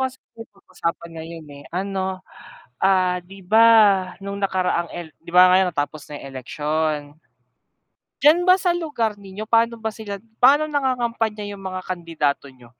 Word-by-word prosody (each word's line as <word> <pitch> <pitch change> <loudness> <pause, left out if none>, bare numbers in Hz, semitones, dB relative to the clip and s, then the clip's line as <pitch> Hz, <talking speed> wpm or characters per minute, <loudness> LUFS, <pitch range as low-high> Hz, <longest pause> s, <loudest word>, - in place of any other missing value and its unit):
kasi 260 - -16 0.3
pag-usapan 180 -4 -6
ngayon, 165 -1 -9
eh. - - -15
Ano, 190 0 -3 0.6
ah, 185 -2 +3
'di 195 +2 -13
ba 220 +5 +5 0.6
nung 200 0 -5
nakaraang 185 -3 0
el 170 -3 -8
'di - - -22
ba 180 0 +8
ngayon 185 0 +4
natapos 145 0 -4
na 145 -1 -8
eleksyon. 150 +2 -3 1.1
Diyan 315 +5 +6
ba 365 +1 +5
sa 355 -2 +1
lugar 265 -11 -2
ninyo, 200 +1 -9
pa'no 230 +1 +2
ba 220 -1 -4
sila 205 -3 -6 0.2
paano 290 +4 +6
nangangampanya 240 -7 -1
yung 195 - -12
mga 185 -1 -6
kandidato 165 -6 -2
niyo? 125 -2 -19
190 Hz, 145 wpm, -22 LUFS, 165-225 Hz, 1.1 s, ba